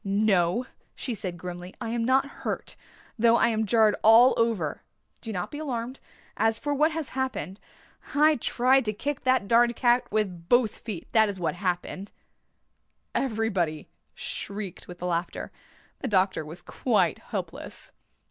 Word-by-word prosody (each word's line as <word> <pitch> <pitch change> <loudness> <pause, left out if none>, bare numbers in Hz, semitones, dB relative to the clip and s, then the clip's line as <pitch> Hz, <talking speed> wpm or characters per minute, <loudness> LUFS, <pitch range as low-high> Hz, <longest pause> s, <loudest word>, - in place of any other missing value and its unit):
"No," 200 +1 +2 0.3
she 250 - -3
said 185 -5 -4
grimly, 180 +1 -8
"I 235 -3 -4
am 235 0 -1
not 260 +3 +3 0.2
hurt, - - -4 0.4
though 230 +1 +5
I 235 - +4
am 220 -1 0
jarred 220 0 +4
all 230 +4 +7
over. 225 -10 0 0.4
Do 225 - -5
not 180 -4 -4
be 295 - -6
alarmed. 255 -3 -4 0.4
As 225 +1 +2
for 290 +3 -2
what 305 +3 +3
has 315 -2 -3
happened 260 -7 -3 0.6
I 305 +1 +5
tried 255 +3 +3
to 215 - 0
kick 285 +7 -4
that 255 -6 +3
darned 235 +2 +4
cat 240 +1 +2
with 185 -6 -2
both 245 -3 +3
feet, 210 -7 -6
that 220 -2 +4
is 195 -2 -5
what 170 - 0
happened." 185 +1 -3 1.0
Everybody 205 - -1 0.3
shrieked 200 -3 -6
with 180 0 -10
laughter. 175 -1 -2 0.5
The - - -3
doctor 190 -4 +2
was 165 +3 -9
quite 230 +4 +1
helpless. - - -7
220 Hz, 150 wpm, -27 LUFS, 185-245 Hz, 1.0 s, all